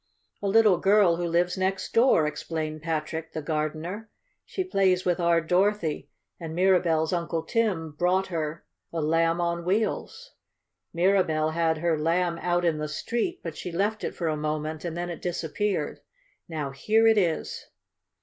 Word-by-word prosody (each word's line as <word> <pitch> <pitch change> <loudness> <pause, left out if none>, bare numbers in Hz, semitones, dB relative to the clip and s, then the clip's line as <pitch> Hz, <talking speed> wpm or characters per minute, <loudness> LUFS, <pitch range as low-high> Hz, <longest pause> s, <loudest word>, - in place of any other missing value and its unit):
"A 200 - -1
little 210 -2 +5
girl 195 -4 +4
who 175 0 -2
lives 175 +2 +1
next 190 0 -1
door," 230 -9 +5
explained 155 0 -4
Patrick, 160 0 -3
the 155 - -3
gardener. 160 +8 -3 0.4
"She 375 - -3
plays 190 - +2
with 180 0 +1
our 170 -1 +3
Dorothy, 180 -4 0 0.3
and 165 -2 -6
Mirabell's 175 -3 +2
Uncle 170 -2 -1
Tim 200 -9 0
brought 180 +5 +1
her 160 -3 -4 0.3
a 165 - -3
Lamb 165 +2 +2
on 170 0 -1
Wheels. 225 - -2 0.6
Mirabell 170 -3 +2
had 160 0 +1
her 165 -1 0
Lamb 170 +2 +1
out 175 0 +1
in 160 -3 +1
the 150 - -2
street, 240 - -2
but - - -5
she 180 - -6
left 205 +5 -1
it - - -3
for 170 - -2
a 155 - 0
moment 155 +1 -3
and 170 -1 -4
then 175 0 -3
it 170 - -7
disappeared. 175 0 -2 0.5
Now 150 -4 -3
here 215 +11 +2
it 220 -1 +5
is!" 170 -5 -2
170 Hz, 160 wpm, -26 LUFS, 160-190 Hz, 0.6 s, little